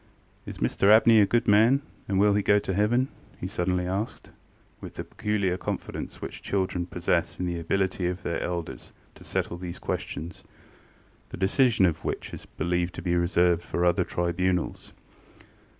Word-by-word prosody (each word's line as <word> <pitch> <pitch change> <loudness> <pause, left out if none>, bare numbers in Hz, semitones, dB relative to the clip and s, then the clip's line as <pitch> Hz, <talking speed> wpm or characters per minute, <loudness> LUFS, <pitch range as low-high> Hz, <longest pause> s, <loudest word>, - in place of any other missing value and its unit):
ŌĆ£Is - - -7
Mr 100 - +2
Abney 110 0 +7
a 100 - +4
good 120 +3 +1
man, 110 +6 +5 0.3
and 95 -1 +1
will 105 0 +5
he 105 - +2
go 100 +1 +4
to 100 -2 -1
heaven? 105 +6 +3
ŌĆØ 135 - -13
he - - -2
suddenly 90 0 -1
asked, 95 +5 -4 0.5
with - - -9
the - - -4
peculiar 105 -5 -1
confidence - - -5
which - - -7
children 95 -3 -1
possess 90 -1 -1
in 90 - -1
the 85 -1 -2
ability 95 +1 0
of 90 +1 -4
their 85 - -2
elders 85 -2 -5 0.2
to - - -15
settle 85 - -2
these 90 -1 -6
questions, 85 +3 -5 0.9
the - - -7
decision 110 +2 +3
of 85 -3 0
which - - -4
is - - -9
believed 90 0 -2
to - - -7
be 90 -1 0
reserved 85 0 +2
for 85 0 -1
other 85 -1 +3
tribunals. 90 +1 -1
95 Hz, 170 wpm, -27 LUFS, 85-105 Hz, 0.9 s, Abney